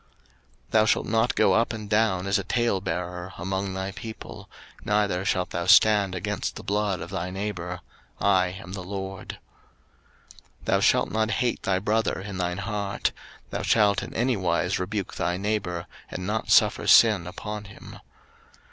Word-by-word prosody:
03:019:016 - - -35 0.6
Thou 110 -1 +5
shalt - - +2
not 115 +2 +1
go - - +4
up 115 +1 +2
and 110 -2 -6
down 105 -3 +2
as 100 0 +2
a - - -3
talebearer 90 -5 -2
among 95 +2 -3
thy 95 +1 -3
people: 110 +3 -9 0.3
neither 105 -3 +1
shalt 90 -2 0
thou 85 +1 -3
stand 100 -1 +5
against 90 - -3
the - - -8
blood 100 -3 -1
of 85 - -7
thy 90 -1 -3
neighbour; 90 -2 -4 0.4
I 90 -1 +3
am 90 0 -8
the 95 - -5
LORD. 95 0 -6 1.2
03:019:017 - - -18
Thou - - +2
shalt - - +3
not 110 +1 +1
hate 120 +2 0
thy 95 -1 +1
brother 105 +3 0
in 95 0 -6
thine 90 0 -1
heart: 100 0 -2 0.4
thou - - -2
shalt 105 -3 +3
in - - -7
any 125 +2 +1
wise 90 -1 0
rebuke 95 +1 -3
thy 90 +1 0
neighbour, 95 -4 -2 0.2
and 90 - -5
not 110 +3 -2
suffer - - +4
sin 105 -7 +6
upon 105 +3 -6
him. 100 - -12
100 Hz, 165 wpm, -26 LUFS, 90-105 Hz, 1.2 s, sin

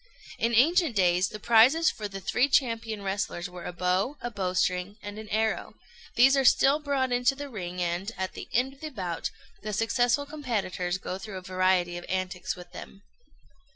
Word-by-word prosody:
In 230 +1 +1
ancient 315 - +4
days, 180 -1 +3
the 215 - -8
prizes 240 +9 +5
for 210 - -5
the 195 -1 -7
three 250 +7 +1
champion 230 -6 0
wrestlers 195 -2 -2
were 180 -1 -10
a - - -4
bow, 185 +10 0
a 240 +1 -5
bowstring, 185 0 -1
and 205 +1 -7
an 220 -1 -9
arrow: 220 +1 -1 0.4
these 265 +3 +6
are 270 - +3
still 275 +3 +5
brought 275 -3 -1
into 245 +2 +2
the 285 0 -7
ring, 180 -6 -6
and, 175 +5 -2
at 190 0 -3
the - - -9
end 255 +3 +1
of 275 - -21
the 310 - -4
bout, 185 - -4 0.3
the 215 0 -5
successful 245 +5 +1
competitors 215 - -2
go 185 0 -5
through 195 -1 -7
a - - -7
variety 185 -1 +1
of 175 - -11
antics 185 -1 -2
with 180 -1 -12
them. 200 - -11
210 Hz, 190 wpm, -27 LUFS, 185-250 Hz, 0.4 s, these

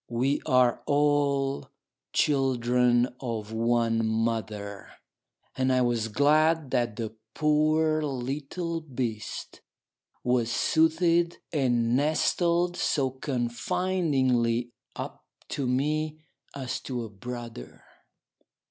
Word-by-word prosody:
We 130 +4 0
are 125 -3 +3
all 145 -1 +1 0.4
children 125 -3 +2
of 110 -4 -4
one 115 0 +1
mother, 110 -3 -2 0.7
and 130 0 +1
I 130 0 +3
was 120 -2 0
glad 150 +4 +3
that 120 -4 0
the 110 -1 -4 0.2
poor 155 +1 +2
little 145 +5 -3
beast 120 -7 -5 0.6
was 125 -2 +1
soothed 165 +5 +2 0.2
and 120 -5 +2
nestled 170 +4 +1
so 135 -7 +1
confidingly 125 -1 0 0.2
up - - -7 0.3
to 140 -4 -2
me, 150 +4 0 0.4
as 130 -3 -3
to 125 -3 -4
a - - -5
brother. 120 - -8
130 Hz, 95 wpm, -27 LUFS, 120-150 Hz, 0.7 s, are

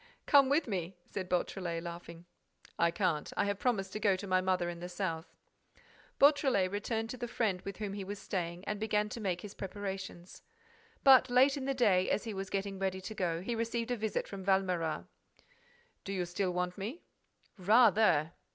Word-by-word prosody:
"Come 280 -3 +6
with 290 +2 +2
me," 185 -3 -3
said 185 -2 -4
Beautrelet, 175 -2 -1
laughing. 170 0 -8 0.5
"I 170 - +4
can't. 170 -4 -1
I - - +2
have 200 -1 -2
promised 195 -7 0
to 215 - -3
go 205 -3 +3
to 185 - -6
my 185 -1 +2
mother 185 -1 +1
in 175 -1 -5
the 175 +1 -6
South." 175 -3 -3 0.9
Beautrelet 270 -10 +4
returned 225 +2 -2
to 255 - -6
the 240 0 -4
friend 210 -6 -1
with 195 -1 -7
whom 205 -2 -4
he 200 -1 -4
was 200 +2 -5
staying 175 -2 -4
and 210 -1 -3
began 210 -1 0
to 230 - -6
make 180 -3 -1
his 205 - -8
preparations. 190 -2 -6 0.6
But, 265 -2 +7
late 260 +3 +5
in 275 -2 -4
the 275 0 -1
day, 200 -7 +3
as - - 0
he 225 -2 -5
was 195 0 -5
getting 195 0 -3
ready 190 -1 -1
to 195 +4 -7
go, 175 -4 -1
he 235 - -2
received 230 +1 -2
a - - +2
visit 220 -2 -2
from 195 -1 -7
Valméras. 185 -4 0 1.0
"Do 195 - -4
you 180 -2 -1
still 180 +2 -1
want 180 +1 -2
me?" 230 - -5 0.6
"Rather!" 205 -6 +5
195 Hz, 190 wpm, -32 LUFS, 180-220 Hz, 1.0 s, But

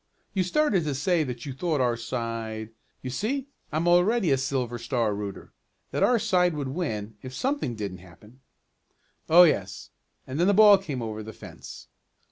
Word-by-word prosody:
You 190 - +1
started 195 - +2
to 145 -2 -1
say 165 +4 +1
that 125 -2 -6
you 140 - -5
thought 155 +2 -1
our 120 -2 +2
side 115 -2 -4 0.3
you 130 - -4
see 250 - -2 0.3
I'm 160 +3 0
already 180 +2 +3
a 135 - +4
Silver 125 -3 -2
Star 115 -2 0
rooter 100 -1 -6 0.4
that - - -2
our 245 - +4
side 180 -6 +2
would 140 -3 -3
win, 110 - -4
if 130 0 -8
something 260 - -1
didn't 100 -4 -5
happen." 95 +8 -17 0.9
"Oh, 175 +3 +9
yes, 100 - 0 0.3
and 130 +4 -5
then 175 - +3
that 200 - +4
ball 205 -1 +8
came 140 -10 -5
over 110 -1 -5
the 110 +1 -8
fence. - - -11
135 Hz, 175 wpm, -26 LUFS, 115-180 Hz, 0.9 s, Oh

